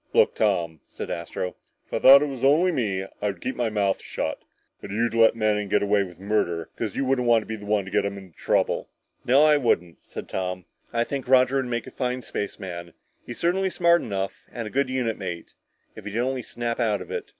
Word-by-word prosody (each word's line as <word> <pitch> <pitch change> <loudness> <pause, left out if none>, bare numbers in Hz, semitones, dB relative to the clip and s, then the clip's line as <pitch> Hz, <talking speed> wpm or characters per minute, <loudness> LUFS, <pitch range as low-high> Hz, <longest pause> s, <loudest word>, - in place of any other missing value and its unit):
"Look, - - +5
Tom," 85 -7 0
said - - -7
Astro, 85 +2 -4 0.3
"if - - -19
I - - +1
thought 140 +2 +9
it - - 0
was 135 -2 -7
only 155 +7 +4
me 100 - -1 0.2
I'd 100 -3 -2
keep 130 - -3
my 120 -2 0
mouth 100 -2 0
shut. - - -3 0.4
But - - -8
you'd 115 +4 0
let 115 -1 +5
Manning 105 -2 0
get - - +2
away 100 0 +3
with 90 -3 -6
murder 85 -5 -1
because 110 -4 -4
you 135 - 0
wouldn't 130 -2 +1
want 115 -2 +4
to - - -16
be 110 - -4
the 105 -1 -10
one 105 -2 +1
to 95 - -9
get - - +2
him 100 0 -3
into 95 -4 -13
trouble." - - 0 0.4
"No, 135 +4 +5
I 150 -1 +6
wouldn't," 90 - 0
said - - -8
Tom. 90 -1 -3 0.3
"I 115 0 +1
think 135 +1 -4
Roger 130 +1 +5
would 135 - 0
make 120 -2 -3
a - - -10
fine 125 -1 -2
spaceman; 85 -5 -5 0.3
he's 120 - -6
certainly 190 +3 +1
smart 170 -1 +3
enough, 95 -2 -4
and 115 -2 -5
a - - -8
good 135 0 +1
unit 125 -4 -1
mate 90 -4 -6 0.4
if - - -11
he'd 105 +1 -4
only 130 +2 0
snap 120 0 -4
out 105 -5 +1
of 90 - -13
it. - - -4
110 Hz, 230 wpm, -25 LUFS, 95-130 Hz, 0.4 s, thought